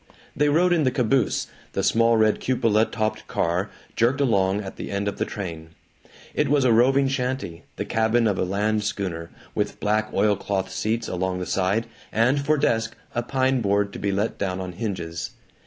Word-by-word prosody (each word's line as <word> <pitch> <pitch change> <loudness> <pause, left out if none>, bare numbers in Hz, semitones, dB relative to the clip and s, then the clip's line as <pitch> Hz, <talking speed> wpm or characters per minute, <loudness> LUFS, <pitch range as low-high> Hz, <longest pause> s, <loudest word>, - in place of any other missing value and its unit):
They 145 +2 +3
rode 175 +4 +4
in 165 -3 +2
the 130 - +3
caboose, 125 -2 +1 0.3
the - - -1
small 115 0 +4
red 110 -1 +3
cupola 115 -4 +2
topped 110 -2 -3
car 90 +4 0 0.3
jerked 120 +4 +2
along 100 -7 +2
at 95 -2 -7
the - - -6
end 100 0 -2
of 100 - -2
the - - +1
train. 80 -4 -7 0.6
It - - +1
was 140 -2 +3
a 120 - +5
roving 135 +4 +4
shanty, 125 - -3
the - - -3
cabin 115 +1 +2
of 100 -4 +1
a - - +2
land 105 +3 0
schooner, 85 -5 -3 0.2
with - - -2
black 110 +1 0
oilcloth 100 -2 0
seats 110 +3 -1
along 90 0 -1
the 90 - -3
side, 100 +5 +1 0.3
and 125 +6 +2
for 155 +2 +2
desk, 115 -5 +1 0.2
a 120 - 0
pine 130 +1 +1
board 100 -1 +1
to - - -6
be 100 - 0
let 100 +3 -1
down 95 -2 -1
on 95 -1 -4
hinges. 90 -4 -4
110 Hz, 190 wpm, -24 LUFS, 95-125 Hz, 0.6 s, a